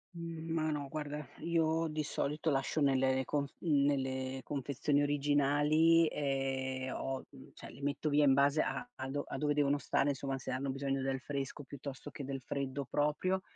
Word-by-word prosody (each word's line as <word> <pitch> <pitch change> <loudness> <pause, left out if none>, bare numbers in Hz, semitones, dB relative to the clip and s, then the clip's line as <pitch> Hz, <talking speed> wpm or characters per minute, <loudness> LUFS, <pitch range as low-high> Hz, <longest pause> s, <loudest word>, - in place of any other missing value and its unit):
Mhmm, 165 -1 -5
ma 155 -1 +1
no 145 -2 -2
guarda 150 0 -4 0.2
io 165 -1 +2
di 155 0 -2
solito 150 +1 -1
lascio 140 +2 0
nelle 135 -2 +3
le 130 0 0
con, 145 +1 0 0.2
mhmm, 145 -5 +3
nelle 130 -1 0
confezioni 145 +1 0
originali, 145 +3 +4
ehm, 135 -2 -1
ho, 135 0 -3
mhmm, 135 -2 -14
cioè - - -10
le - - -12
metto 145 +2 0
via 145 0 +4
in 135 - +6
base 140 +3 +4
a 245 - -2
a 130 - -5
do 145 +1 -1
a - - -4
dove 150 -1 +1
devono 145 -1 +3
stare, 140 0 +1
insomma 135 -1 -2
se 130 - -7
hanno 130 +1 -1
bisogno 135 0 -1
del 135 0 -1
fresco 140 +2 -4
piuttosto 140 +1 -7
che 145 - -7
del 135 0 -4
freddo 140 +1 -3
proprio 150 +6 +1
140 Hz, 185 wpm, -34 LUFS, 135-150 Hz, 0.2 s, in